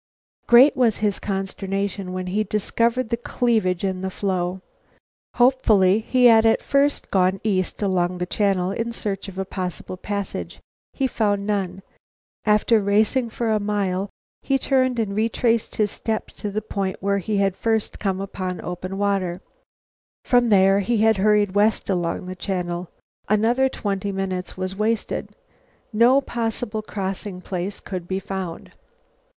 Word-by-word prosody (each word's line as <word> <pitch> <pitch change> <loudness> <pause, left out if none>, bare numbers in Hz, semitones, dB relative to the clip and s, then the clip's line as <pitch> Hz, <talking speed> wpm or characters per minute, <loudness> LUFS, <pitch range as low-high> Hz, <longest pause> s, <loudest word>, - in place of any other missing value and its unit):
Great 250 +5 +7
was 235 -4 +2
his 210 -2 0
consternation 195 -1 -3
when 185 0 -4
he 200 +4 0
discovered 230 +3 0
the 235 - 0
cleavage 220 -7 0
in 190 -1 -1
the 190 - -2
floe. 185 -1 -2 0.8
Hopefully 220 -6 +4
he 250 +3 +2
had 225 -2 +7
at 225 0 +4
first 280 +1 +1
gone 190 0 +2
east 195 -1 -1
along 180 -2 0
the 180 - -2
channel 190 -1 0
in 230 +3 -2
search 205 -4 -4
of 190 -1 -9
a 190 - -2
possible 185 -1 -5
passage. 200 +1 -4 0.3
He 270 - -1
found 205 -5 0
none. 195 -3 -2 0.6
After 215 +1 +4
racing 215 +5 +2
for 225 0 -2
a 215 - +2
mile, 200 -2 -1 0.3
he 275 - +1
turned 260 -2 +1
and 210 -3 -1
retraced 230 +1 +1
his 210 -2 +1
steps 220 -1 -3
to 210 - -5
the 210 +1 -3
point 195 -3 -2
where 200 +1 0
he 205 +2 -2
had 195 -1 +1
first 220 0 -1
come 195 -2 -1
upon 185 -2 -4
open 185 +2 -5
water. 195 -3 0 0.9
From 245 -1 +3
there 195 -1 +5
he 215 +2 +1
hurried 210 -2 +3
west 205 0 +2
along 175 -1 -1
the 185 0 -6
channel. 180 -2 -3 0.4
Another 235 +5 +3
twenty 200 -4 -3
minutes 190 -2 -4
was 185 +1 -3
wasted. 215 +2 -2 0.6
No 240 +5 +5
possible 225 -3 -3
crossing 195 -2 -5
place 185 +2 -4
could 180 -3 -6
be 190 - -1
found. 190 -3 -6
200 Hz, 150 wpm, -23 LUFS, 190-225 Hz, 0.9 s, Great